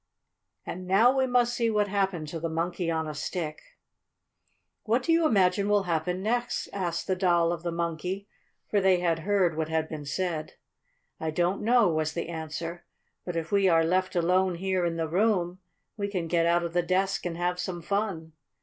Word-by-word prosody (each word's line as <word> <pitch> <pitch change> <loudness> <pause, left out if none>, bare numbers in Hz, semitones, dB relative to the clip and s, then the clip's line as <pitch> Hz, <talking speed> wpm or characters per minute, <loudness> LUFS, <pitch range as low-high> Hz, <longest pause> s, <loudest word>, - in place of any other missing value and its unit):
And 185 +1 -6
now 225 +8 +5
we 265 -1 +2
must 245 -1 +2
see 235 -1 +1
what 210 -2 +1
happened 190 -5 -1
to 165 - -5
the 165 +1 -2
Monkey 170 +2 -2
on 160 -1 -1
a 155 - -4
Stick. 155 +1 -4 1.2
"What 235 +3 +1
do 330 - +1
you 330 -1 +4
imagine 200 -3 +2
will 205 -1 +3
happen 180 +1 -1
next?" 240 +3 -1
asked 175 -4 -2
the 185 - 0
Doll 175 -2 +3
of 170 -1 -3
the 170 0 -3
Monkey, 170 +4 -3 0.4
for 205 - +1
they 190 -1 +4
had 170 -2 +1
heard 185 -2 +1
what 160 0 -2
had 160 0 0
been 150 -2 -6
said. 160 +1 -3 0.7
"I 160 - -2
don't 175 +4 0
know," 235 0 +4
was 155 -2 0
the 170 -1 -4
answer. 165 +1 -5 0.4
"But 175 - -4
if 165 -1 -3
we 200 -2 +4
are 165 -1 +4
left 185 +3 0
alone 180 +1 +2
here 185 0 0
in 165 - -2
the 165 -1 -1
room 180 0 +1 0.4
we 200 -1 -1
can 185 -4 -2
get 170 0 +2
out 170 0 +3
of 170 -1 -4
the 175 - +3
desk 190 +2 0
and 165 -1 -5
have 180 +1 -1
some 180 -1 -4
fun." 190 -5 -2
180 Hz, 195 wpm, -28 LUFS, 165-195 Hz, 1.2 s, now